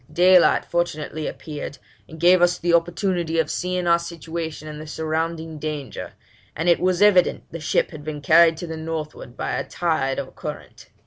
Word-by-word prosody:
Daylight 180 +3 +5
fortunately 155 -3 -2
appeared, 150 -2 -7 0.3
and 160 - -11
gave 175 +2 +5
us 175 0 +4
the 175 0 0
opportunity 170 0 +1
of 160 -2 +1
seeing 180 0 -2
our 170 0 +4
situation 165 -2 -6
and 150 0 -7
the 155 - -9
surrounding 160 +1 -3
danger, 150 -2 -5 0.4
and 165 +3 -2
it 170 - +5
was 185 +1 +2
evident 190 -4 +4
the 165 - -6
ship 155 - 0
had 155 -3 -9
been 155 -1 -5
carried 160 +2 +5
to 175 - -5
the 160 -1 -6
northward 155 -5 -6
by - - -3
a - - -1
tide 155 -6 -1
or - - -6
current. - - -8
165 Hz, 180 wpm, -23 LUFS, 155-175 Hz, 0.4 s, Daylight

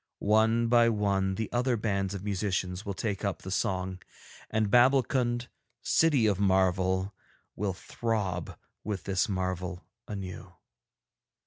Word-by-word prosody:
One 110 +2 +3
by 120 0 +5
one 100 -3 +1
the 110 +1 -2
other 125 0 +1
bands 100 -3 -1
of 95 - -6
musicians 95 -2 -2
will 100 - -3
take 100 -2 -3
up 100 -6 -2
the 95 - -6
song, 95 -1 -1 0.5
and 110 -2 0
Babbulkund, 125 -1 +3 0.4
City 150 -8 +3
of 100 -3 +2
Marvel, 95 0 +2 0.4
will 100 -1 -1
throb 95 -3 -3 0.3
with 105 -3 -4
this 95 0 0
marvel 95 -2 -3 0.2
anew. 95 -3 -7
100 Hz, 125 wpm, -29 LUFS, 95-110 Hz, 0.5 s, by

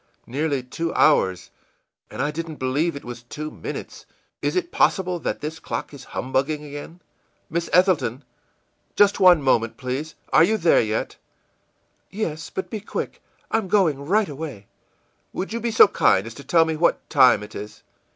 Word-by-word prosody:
Nearly 140 +1 -1
two 165 +6 -4
hours, 95 -12 +3 0.6
and - - -3
I 145 - 0
didn't 160 0 -5
believe 145 +5 -1
it 140 - -8
was 120 -1 -7
two 155 +6 -7
minutes! - - -8 0.3
Is - - -1
it 360 -1 -1
possible 180 -2 +1
that - - -3
this 160 +2 -5
clock - - -5
is 135 -2 -11
humbugging 135 +4 -2
again? 145 +4 -9 0.5
Miss 170 +1 -2
Ethelton! 170 - +2 0.7
Just 205 0 +4
one 180 -5 +6
moment, 115 -4 +1
please. 135 +4 -4 0.2
Are 155 - +7
you 220 +6 +2
there 170 -4 +4
yet?î 110 0 -2 1.0
ìYes, 160 -6 -3
but 190 - -5
be 220 - -3
quick; 205 - -5 0.3
I'm 225 -3 0
going 175 -8 +2
right 200 +7 +2
away.î 140 -8 -7 0.7
ìWould 190 - -3
you 230 - -2
be 235 +1 -1
so 225 - +7
kind 95 - +2
as 115 - -8
to 140 - -11
tell 165 +1 +4
me 160 -1 -2
what 170 +3 +1
time 130 -7 +5
it 105 - -11
is? 105 +1 -9
155 Hz, 170 wpm, -23 LUFS, 130-175 Hz, 1.0 s, Are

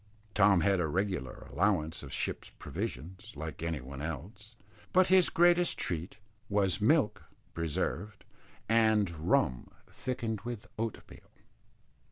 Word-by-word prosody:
Tom 95 -3 +5
had 95 +1 +3
a 85 - +1
regular 90 -5 -2
allowance 90 -4 +1
of 70 - -9
ship's - - -3
provisions, 95 +8 -6
like 80 0 -6
any 80 -2 -2
one 70 +2 -8
else, 95 - -7 0.4
but 185 -1 +4
his 185 -2 +6
greatest 175 +1 +4
treat 85 +3 -2 0.3
was 100 -2 +2
milk 135 +1 +3 0.3
(preserved) 85 +5 -2 0.4
and 110 -4 +3
rum 75 -6 +1 0.2
thickened 115 -5 -3
with 120 -1 -6
oatmeal. 115 -1 -6
100 Hz, 120 wpm, -31 LUFS, 80-110 Hz, 0.4 s, his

